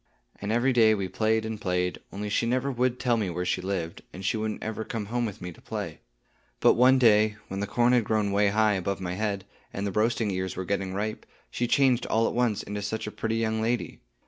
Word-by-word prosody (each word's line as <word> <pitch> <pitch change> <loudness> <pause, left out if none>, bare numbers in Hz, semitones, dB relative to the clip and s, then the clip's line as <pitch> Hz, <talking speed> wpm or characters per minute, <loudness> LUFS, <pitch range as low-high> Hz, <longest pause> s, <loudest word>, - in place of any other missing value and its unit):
And 100 +1 -4
every 120 +3 +2
day 110 -2 +5
we 100 -2 -2
played 110 +4 +1
and 110 -1 -5
played; 90 -1 -1
only 105 +1 -4
she 105 +3 0
never 130 +3 0
would 125 0 0
tell 120 -2 +2
me 105 -4 -1
where 90 +1 -3
she - - 0
lived, 90 -3 -3
and 95 +1 -8
she 100 - +1
wouldn't 110 0 -3
ever 110 0 -3
come 110 -1 -4
home 120 +2 -1
with 100 - -8
me 90 - -5
to - - -16
play. - - -5 0.6
But - - +6
one 130 +2 +5
day, 110 -3 +5
when 95 - -4
the 100 - -2
corn 120 +4 +3
had 120 -2 +4
grown 105 -1 0
way 100 +1 +3
high 105 +1 +3
above 100 0 -2
my 90 -1 -3
head, 100 -1 -2 0.3
and 100 - -3
the 100 - -1
roasting 110 +1 +1
ears 95 0 -3
were 95 - -4
getting 95 0 -2
ripe, 110 +2 -3 0.2
she 120 - -1
changed 130 -2 +3
all 115 +1 +2
at - - -2
once 120 -4 +1
into 105 +1 -5
such 110 +2 -3
a 105 - -5
pretty 110 +1 -2
young 110 -1 0
lady. 120 +2 -1
110 Hz, 240 wpm, -27 LUFS, 100-115 Hz, 0.6 s, But